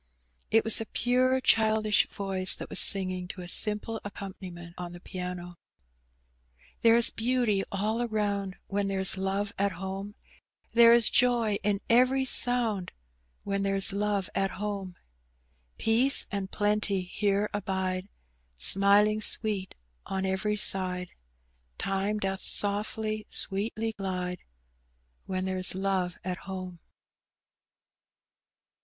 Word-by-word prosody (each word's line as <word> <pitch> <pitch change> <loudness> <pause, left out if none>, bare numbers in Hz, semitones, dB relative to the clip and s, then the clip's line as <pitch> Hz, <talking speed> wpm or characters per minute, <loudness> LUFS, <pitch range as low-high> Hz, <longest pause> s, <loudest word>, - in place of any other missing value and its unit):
It 225 0 +4
was 225 0 +4
a 225 - -5
pure 255 +1 +2
childish 215 -2 +3
voice 190 -2 +1
that - - -8
was - - +2
singing 185 -2 +3
to 185 - -8
a 175 - -8
simple 210 +4 0
accompaniment 185 -4 -8
on 175 -1 -7
the 175 - -9
piano, 180 -1 -7 0.6
— - - -34
"There 230 0 +6
is 235 - +5
beauty 230 -4 +1
all 210 +4 -1
aronnd, 205 -4 -2
When 200 0 -2
there's 190 -1 +2
love 195 +2 -2
at 200 -1 +1
home; 195 +3 -6 0.6
There 235 0 +7
is 235 -2 +4
joy 235 -4 +3
in 200 0 0
every 255 +3 +3
sonnd, 235 -7 0 0.5
When 200 0 -2
there's 195 -1 +2
love 200 -1 -1
at 195 0 0
home. 200 -3 -4 0.8
Peace 245 +5 +3
and 195 -2 -3
plenty 205 -2 0
here 200 +2 0
abide, 190 -1 -2 0.5
SmiHng 200 - +5
sweet 205 -3 -3 0.3
on 190 0 -2
every 190 +3 -1
side; 180 -3 0 0.7
Time 195 +2 -1
doth 195 -2 -3
softly, 215 +1 -3
sweetly 220 +3 -2
glide, 180 -2 -4 0.8
When 185 0 -2
there's 185 -1 +2
love 190 -2 -1
at 180 -1 -3
home." 185 -2 -6
200 Hz, 120 wpm, -28 LUFS, 185-215 Hz, 0.8 s, There